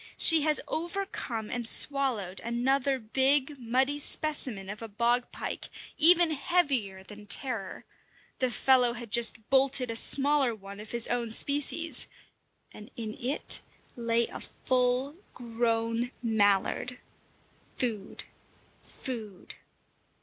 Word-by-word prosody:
She 325 -2 +7
has 305 0 +2
overcome 330 - -4
and 240 -2 0
swallowed 235 -10 +2
another 265 +3 0
big, 265 +4 +1
muddy 260 +4 0
specimen 270 -10 0
of 210 +2 -8
a 225 - -6
bog 235 +3 0
pike, - - -6 0.3
even 345 +1 +6
heavier 275 - -1
than 210 +1 -13
Terror; 220 -4 0 0.5
the 255 - +1
fellow 250 -1 +3
had 235 -2 -9
just 230 -1 +1
bolted 265 -2 +4
a - - -5
smaller 275 0 +2
one 200 -1 -12
of 210 0 -10
his 235 -1 +3
own 235 -2 -2
species, 290 +6 0 0.7
and 210 +3 -12
in 220 -2 -6
it 260 +4 -1 0.3
lay 235 -1 0
a - - -9
full 255 +4 -1 0.2
grown 230 0 -2
mallard. 220 +2 0 0.8
Food! 220 -5 -4 0.6
Food! 220 -7 -8
245 Hz, 115 wpm, -28 LUFS, 225-275 Hz, 0.8 s, She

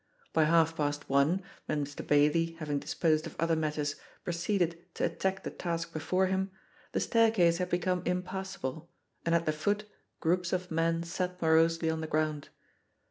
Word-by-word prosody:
By 160 - +4
half 165 0 +4
past 145 -1 -2
one, 145 +8 +3 0.2
when 145 -1 0
Mr. 145 0 -7
Bailey, 150 +3 +3
having 150 -3 -2
disposed 155 +1 +1
of - - -10
other 165 0 +2
matters, 150 -2 -1 0.3
proceeded 170 -1 0
to - - +1
attack 190 0 -1
the - - -4
task 165 -1 -3
before 185 +4 +1
him, 190 +1 0 0.4
the - - 0
staircase 220 -8 +3
had 180 0 -1
become 180 +1 +1
impassable, 180 -4 -3 0.4
and 165 - +4
at 170 0 +1
the 155 - +2
foot, 205 +7 0 0.3
groups 180 +2 +1
of 180 -1 -2
men 165 +1 +1
sat 180 +1 -3
morosely 165 0 +3
on 160 0 -3
the 160 - -3
ground. 155 -1 -1
165 Hz, 165 wpm, -31 LUFS, 155-180 Hz, 0.4 s, By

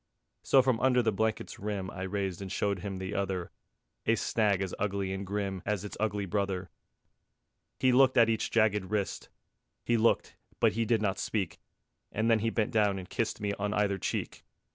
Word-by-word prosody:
So 135 - +5
from 125 -3 +2
under 125 -1 +3
the 110 - +2
blanket's 110 +2 -2
rim 100 -2 -3
I 95 - -7
raised 95 -1 -2
and 95 -2 -6
showed 100 0 0
him 95 +1 -5
the 95 +2 -4
other, 95 -3 -2 0.6
A - - +5
snag 105 -4 +1
as 95 - -4
ugly 100 -1 -1
and 95 0 -5
grim 100 -2 -2
As 105 -1 -2
its 105 - -7
ugly 105 -2 0
brother. 95 -1 -2 1.1
He 130 - +4
looked 130 +1 +5
at 115 -2 +7
each 110 -1 0
jagged 105 -3 +2
wrist; 105 -2 -2 0.6
He 120 - +3
looked, 115 +1 +2 0.2
but - - +4
he 115 +1 0
did 110 -1 +2
not 95 -2 0
speak; 95 -6 -2 0.5
And 110 +2 +1
then 115 - +4
he 115 +2 +1
bent 110 -1 0
down 105 -3 +2
and 90 -1 -7
kissed 115 -2 -1
Me 105 -1 -1
on 105 +1 -1
either 100 -2 +1
cheek. - - -3
105 Hz, 190 wpm, -30 LUFS, 95-110 Hz, 1.1 s, at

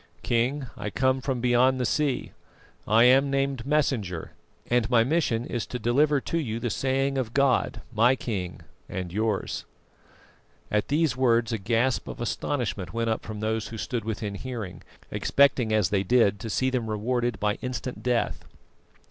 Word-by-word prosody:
"King, 125 +4 0
I 105 - -4
come 130 +4 +1
from 130 -2 -2
beyond 125 +2 +3
the 125 - 0
sea; 140 -1 0 0.6
I 110 +2 +5
am 135 +3 +5
named 135 -2 -1
Messenger, 120 - 0 0.4
and 120 -2 +1
my 115 -2 +5
mission 125 -4 0
is 120 -4 -3
to 125 - -4
deliver 140 +6 +2
to 165 - -1
you 115 -7 -3
the 120 -1 -2
saying 135 +3 0
of 120 -3 -4
God, 140 -2 +2
my 120 +4 +4
King 95 -9 -4 0.3
and 90 -2 -5
yours." 110 -1 -1 1.1
At 105 0 +1
these 150 -3 +1
words 120 -2 +2
a 110 - -1
gasp 115 +5 0
of - - -7
astonishment 120 -5 -2
went 115 -1 0
up 110 - -1
from 110 -1 -6
those 110 0 -1
who 115 - -7
stood 115 +1 -3
within 105 -1 -3
hearing, 105 -3 -6 0.3
expecting 130 -5 +3
as 105 -6 +3
they 100 -2 +2
did 100 0 +3
to 115 - -5
see 130 +5 +1
them 120 -4 -1
rewarded 120 +2 -1
by 105 0 0
instant 125 0 -4
death. 125 -1 0
120 Hz, 165 wpm, -26 LUFS, 110-130 Hz, 1.1 s, I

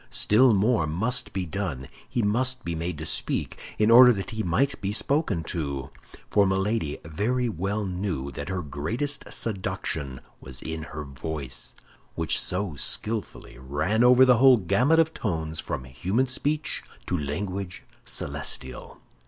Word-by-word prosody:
Still 120 +4 +5
more 105 -4 +2
must 110 +11 -1
be 95 -2 -2
done. 80 -7 -4 0.2
He 120 - 0
must 125 +5 0
be 85 - -2
made 80 0 -3
to 80 - -6
speak, - - -3
in 110 +1 +3
order 125 +1 +10
that 100 +4 -5
he 110 -1 -3
might 130 +11 0
be 100 -1 -1
spoken 110 - +1
to—for 75 +6 -2
Milady 95 -4 0
very 115 +10 0
well 100 +1 -2
knew 90 -7 -3
that 65 - -6
her 95 -2 -2
greatest 105 - -2
seduction 80 - -3 0.2
was 65 0 -8
in 80 0 -4
her 75 0 -6
voice, 70 0 -7 0.4
which - - 0
so 90 -1 -2
skillfully 105 - -1
ran 75 - 0
over 125 +1 +7
the 125 -2 +5
whole 130 +1 +7
gamut 110 - +3
of 160 0 +3
tones 80 -6 -3
from 75 -7 -4
human 90 - 0
speech 145 +4 -1 0.2
to - - -1
language 90 +5 -4 0.2
celestial. 65 0 -5
95 Hz, 145 wpm, -26 LUFS, 80-115 Hz, 0.4 s, order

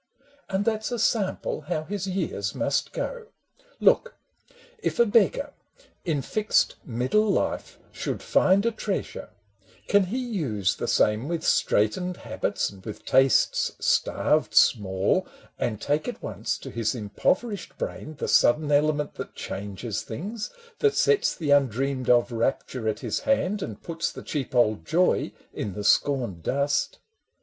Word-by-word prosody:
And 195 +1 0
that 220 -1 0
's - - -3
a 240 - -1
sample 215 -3 0
how 155 -3 -1
his 195 +2 -4
years 190 +1 -2
must - - 0
go. - - -4 0.5
Look, 480 - +3 0.6
if - - -2
a 235 - +6
beggar, 230 +7 +2 0.5
in 150 -6 -1
fixed 215 +7 +1
middle 130 - +1
life, - - -1
Should - - -4
find 195 +3 +3
a 230 - +3
treasure, 215 -3 -4 0.3
— 95 -1 -30
can 200 -1 +4
he 210 +8 -3
use 155 - -1
the - - -3
same 105 +5 +2
With 165 -1 -2
straitened 180 - +1
habits - - -2
and 95 -2 -15
with 105 - -8
tastes 135 0 +3
starved - - +1
small, 95 -1 +3 0.3
And 110 -4 -1
take 145 +5 -1
at 245 - -6
once 110 +1 -3
to - - -9
his 115 0 -1
impoverished 185 - -1
brain 155 - -5
The - - -4
sudden 150 0 +4
element 150 0 +2
that - - -7
changes 100 +2 -5
things, 205 - -5 0.3
That 430 -1 +3
sets 440 -2 +3
the 155 -5 -2
undreamed 135 -1 +2
of 120 0 +4
rapture 115 0 -1
at 110 - -3
his - - -1
hand 210 -7 0
And 110 - -6
puts 165 -1 -2
the - - -9
cheap 140 -3 -4
old 110 -7 +3
joy 175 - +2 0.2
in 100 - -4
the 105 - -4
scorned 120 - +2
dust? 140 - 0
150 Hz, 150 wpm, -26 LUFS, -, 0.6 s, a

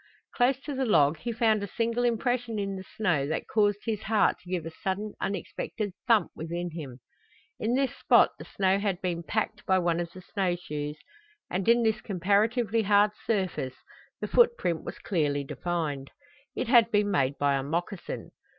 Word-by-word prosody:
Close 255 +1 +2
to 295 - -5
the 265 0 -1
log 155 - +4
he 235 - -3
found 220 -2 +2
a 200 - -3
single 230 +4 -1
impression 240 -1 0
in 195 -1 -2
the 190 - -6
snow 175 -10 +1
that 155 - -3
caused 205 -2 +2
his 220 -3 -1
heart 215 0 +3
to 180 - -15
give 180 -3 -2
a 165 - -5
sudden 195 +5 -3
unexpected 205 +1 -3 0.2
thump 230 -3 +4
within 170 +2 -4
him. 140 -6 -7 0.6
In 230 +3 0
this 270 0 0
spot - - +5
the - - -8
snow 195 0 +1
had 200 -3 -1
been 175 -3 -2
packed 215 +3 -2
by 190 -1 +4
one 170 -2 +1
of 170 -1 -3
the 185 - -11
snow 185 -1 -1
shoes, 150 -3 -5 0.5
and 185 +4 0
in 235 0 +5
this 220 -1 +1
comparatively 210 +4 +1
hard 205 0 +4 0.2
surface 185 - -1 0.4
the - - -3
footprint 470 - +3
was - - -7
clearly 145 -6 0
defined. 150 -3 -3 0.5
It - - -2
had 235 -3 +6
been 205 -2 +2
made 140 -6 +1
by 145 -1 +2
a 135 - +1
moccasin. 175 +7 -4
195 Hz, 180 wpm, -28 LUFS, 170-220 Hz, 0.6 s, had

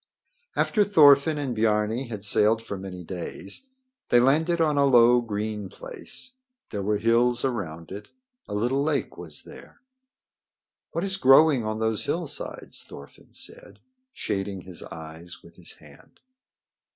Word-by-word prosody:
After 210 - +2
Thorfinn 150 -5 +6
and 135 -4 -3
Biarni 110 +3 +1
had 105 -3 -5
sailed 110 +2 +3
for 100 - -5
many 95 -2 -8
days 95 - -6 0.4
they 120 - +6
landed 160 +7 +3
on 155 -2 +2
a 140 0 +4
low, 120 -2 +6
green 105 -2 -4
place. 260 - -7 0.4
There 100 - -3
were 105 +2 0
hills 120 +3 +2
around 85 -11 -4
it. 100 +2 -8 0.4
A 105 - -5
little 120 +6 +1
lake 145 -5 -1
was 80 -4 -9
there. - - -14 1.1
"What 170 - -3
is 195 -1 0
growing 135 -3 +6
on 110 0 -2
those 110 -2 0
hillsides?" 160 -4 -4
Thorfinn - - -14
said, - - -11 0.3
shading 95 - -4
his 90 -1 -9
eyes 80 +2 -10
with - - -17
his - - -6
hand. - - -18
115 Hz, 140 wpm, -26 LUFS, 100-140 Hz, 1.1 s, Thorfinn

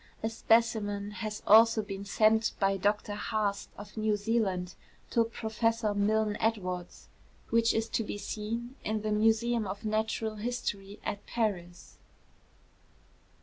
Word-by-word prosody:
A 220 - 0
specimen 220 -3 +1
has 215 0 -5
also 225 +1 +6
been 200 -1 -6
sent 220 +2 +3
by 195 0 +2
Dr 205 +2 0
Haast 205 -1 -1
of 205 0 -10
New 215 -1 +1
Zealand 200 -4 0 0.4
to 230 - +4
Professor 225 -1 -1
Milne 210 +1 +1
Edwards, 185 -6 -2 0.4
which 230 0 +4
is 225 0 0
to 225 - 0
be 205 - -5
seen 230 +5 -4
in 215 0 -2
the 215 - -1
Museum 225 +1 +2
of 200 +3 -6
Natural 220 0 -1
History 205 -3 -4
at 205 - -3
Paris. 180 -7 -3
215 Hz, 130 wpm, -30 LUFS, 205-225 Hz, 0.4 s, also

